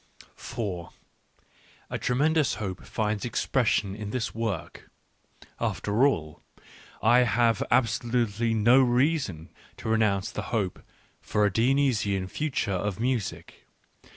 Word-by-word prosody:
A - - -2
tremendous 150 +2 +2
hope 95 -3 -5
finds 105 -1 -2
expression 115 -4 0
in 105 -1 -6
this 115 +1 -3
work. 110 -6 -4 0.7
After 110 +7 +2
all, 80 - -3 0.6
I 120 +3 +6
have 115 -2 +2
absolutely 115 -1 +1
no 120 +5 +5
reason 125 - +1 0.3
to - - -5
renounce 105 -4 +1
the - - -4
hope 105 -6 -2 0.4
for 105 0 +1
a 100 - +1
Dionysian 115 -6 +2
future 140 -5 -2
of 100 +1 -2
music. 120 -3 -3
115 Hz, 105 wpm, -27 LUFS, 100-125 Hz, 0.7 s, I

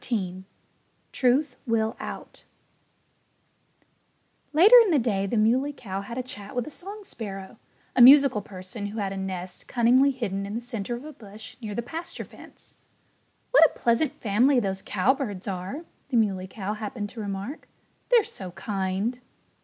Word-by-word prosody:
XIII 190 -5 -3 0.7
TRUTH 255 +1 +2
WILL 225 -1 +1
OUT - - -8 2.1
Later 370 +11 +7
in 430 - 0
the 320 - +4
day 205 -6 0
the 225 - -1
Muley 250 +7 +3
Cow 195 -7 -5
had 235 +4 -7
a 255 - -1
chat 205 -5 -9
with 245 -2 -1
a - - -8
song 405 +6 -9
sparrow 200 - -7 0.4
a - - +5
musical 275 -3 +8
person 195 +2 -7
who 210 +2 -7
had 195 -2 -2
a - - -5
nest 185 -1 -5
cunningly 255 +3 +4
hidden 200 -7 -3
in 205 - -5
the - - -1
center 240 -1 -4
of 245 +4 -9
a 310 - -8
bush 220 +2 -11
near 210 -3 -5
the 235 - -2
pasture 330 +7 -6
fence. - - -10 0.7
"What 325 -10 +8
a - - -15
pleasant 240 +5 +2
family 245 +6 +3
those 195 -3 -2
cowbirds 210 -1 0
are!" 195 - -4 0.2
the 250 - +1
Muley 195 -4 +1
Cow 195 +1 -4
happened 210 0 -5
to 230 - -10
remark. 200 +8 -5 0.4
"They're 475 -3 +6
so 190 - -7
kind!" 200 +4 -2
225 Hz, 160 wpm, -26 LUFS, 195-255 Hz, 2.1 s, musical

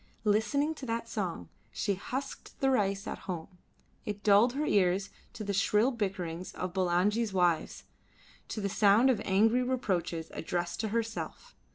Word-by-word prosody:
Listening 235 +9 +2
to 285 - -8
that 230 0 -2
song 185 - -3 0.2
she 200 - -1
husked 260 +8 -6
the 270 0 +3
rice 195 -5 +1
at - - -5
home; 180 +1 -5 0.4
it 205 0 -5
dulled 210 +4 +5
her 295 +3 -1
ears 195 -2 +2 0.2
to 225 -2 -6
the 200 -1 -2
shrill 210 +5 +3
bickerings 185 -6 -3
of 180 -1 -4
Bulangi's 190 +4 +1
wives, 175 -4 +1 0.6
to - - -4
the 200 - 0
sound 210 +6 +5
of 220 -5 -1
angry 220 +6 +3
reproaches 180 -10 -1
addressed 175 +1 -3
to 220 - -1
herself. 225 +1 -4
205 Hz, 155 wpm, -30 LUFS, 185-230 Hz, 0.6 s, dulled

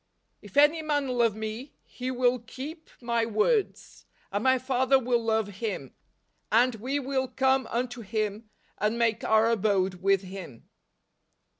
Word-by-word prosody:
" - - -48
If 205 +2 -11
any 295 +3 +5
man 290 -3 -1
love 235 -4 +2
me, 220 +5 -6
he 255 0 -6
will 250 0 +2
keep 280 +8 -9
my 235 -1 0
words: 230 - -1 0.2
and 205 +2 -1
my 260 0 +4
Father 260 +1 +2
will 240 -2 0
love 220 -3 -1
him, 195 - -4 0.6
and 245 +3 +4
we 255 +6 -2
will 265 -1 -1
come 265 -1 +1
unto 245 0 -3
him, 215 0 -3 0.3
and 210 +2 0
make 230 -1 +1
our 220 +1 +4
abode 190 -4 +1
with 195 0 +3
him." 185 -10 -10
235 Hz, 150 wpm, -27 LUFS, 215-260 Hz, 0.6 s, any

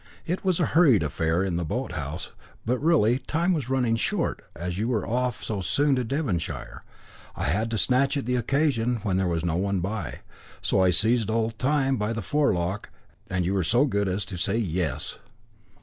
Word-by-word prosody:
It 180 +3 -2
was 185 -3 +1
a 170 - +3
hurried 145 - +5
affair 80 +4 0
in 90 -3 -1
the 85 - -1
boat 80 - -3
house, - - -5 0.3
but 125 +2 0
really, 135 -7 +3
time 165 +7 0
was 140 -7 -2
running 125 -4 +2
short; 115 - -1
as 90 +2 -4
you 110 - 0
were 115 -6 -1
off 125 +1 -1
so 105 -3 -3
soon 140 - +2
to 125 - 0
Devonshire, 90 - -3 0.5
I - - -4
had 105 - 0
to 115 - -1
snatch 135 +5 +2
at 140 - -3
the 125 +1 0
occasion 125 -1 +1
when 95 -4 0
there 95 -1 +1
was 85 -1 -1
no 85 -1 0
one 100 +1 0
by, 95 -2 -4 0.4
so - - +1
I 95 - +5
seized 110 +5 +3
old 115 0 -1
Time 135 -1 +2
by 105 +1 -1
the 115 -2 -4
forelock, 95 -8 0 0.4
and 90 -1 0
you 95 - 0
were 95 -2 +1
so 120 - +3
good 100 -7 0
as 95 +2 -1
to 95 - -7
say 100 +5 0
'Yes.'" 90 - -2
110 Hz, 200 wpm, -26 LUFS, 90-130 Hz, 0.5 s, hurried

